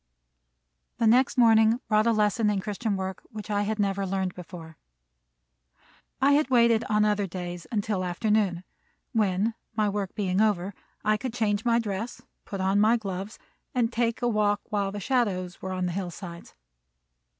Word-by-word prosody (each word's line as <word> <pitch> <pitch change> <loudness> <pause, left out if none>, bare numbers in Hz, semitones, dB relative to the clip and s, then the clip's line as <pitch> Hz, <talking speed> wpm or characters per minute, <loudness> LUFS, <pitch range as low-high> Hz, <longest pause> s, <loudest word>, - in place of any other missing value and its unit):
The 230 - +1
next 255 +5 +4
morning 225 -1 +5
brought 215 +1 +3
a - - +5
lesson 210 0 +2
in 205 -2 0
Christian 210 +1 -2
work 190 -1 -4
which 215 -1 -7
I 205 0 +1
had 210 +1 -1
never 200 -1 0
learned 190 -1 -1
before. 165 -2 -10 1.4
I 275 +2 +4
had 285 -1 +3
waited 235 -2 +4
on 210 0 +2
other 205 -1 +1
days 175 -2 -6
until 205 -3 -1
afternoon, 185 0 0 0.5
when, 210 0 +1 0.2
my 215 -1 +2
work 200 -2 -3
being 195 -2 0
over, 200 -3 +1 0.3
I 215 0 +3
could 245 +1 -5
change 215 -2 0
my 235 -1 +4
dress, 220 0 -3 0.3
put 195 - -6
on 190 +2 +2
my 225 +3 +5
gloves, 195 -1 -5 0.4
and 240 -1 +1
take 235 0 0
a - - +3
walk 210 -2 +1
while 200 -2 0
the 205 - -5
shadows 195 -6 -1
were 190 - -4
on 185 -1 -1
the 180 - -1
hillsides. 175 -1 -7
205 Hz, 165 wpm, -27 LUFS, 190-225 Hz, 1.4 s, morning